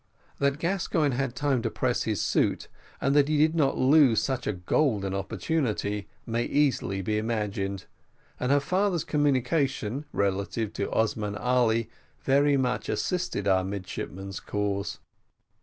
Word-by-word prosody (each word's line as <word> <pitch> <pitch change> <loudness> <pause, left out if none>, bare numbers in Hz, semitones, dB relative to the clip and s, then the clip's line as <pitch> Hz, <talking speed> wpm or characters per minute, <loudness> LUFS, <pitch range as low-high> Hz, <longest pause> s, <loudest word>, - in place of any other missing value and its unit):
That 140 0 +1
Gascoigne 165 -4 0
had 130 -1 -2
time 140 -4 +1
to 115 - -1
press 125 +1 -1
his 110 -4 -1
suit, - - 0 0.3
and 135 +1 +1
that 145 -1 +5
he 155 0 +1
did 155 +2 +4
not 150 -5 +2
lose 135 -3 +5
such 130 -2 -2
a - - +1
golden 100 - 0
opportunity, 105 -1 -2 0.2
may 115 +1 -1
easily 130 -9 +1
be 105 +3 0
imagined, 100 -4 -2 0.5
and 125 - 0
her 145 - +5
father's 180 +3 0
communication 140 -2 0
relative 100 +2 -1
to 100 - -3
Osman 105 -2 0
Ali 115 -1 +2 0.3
very 140 +1 +3
much 125 -2 -1
assisted 180 - -1
our 95 -1 +3
midshipman's 95 0 -5
cause. 100 -1 -2
125 Hz, 140 wpm, -27 LUFS, 100-145 Hz, 0.5 s, that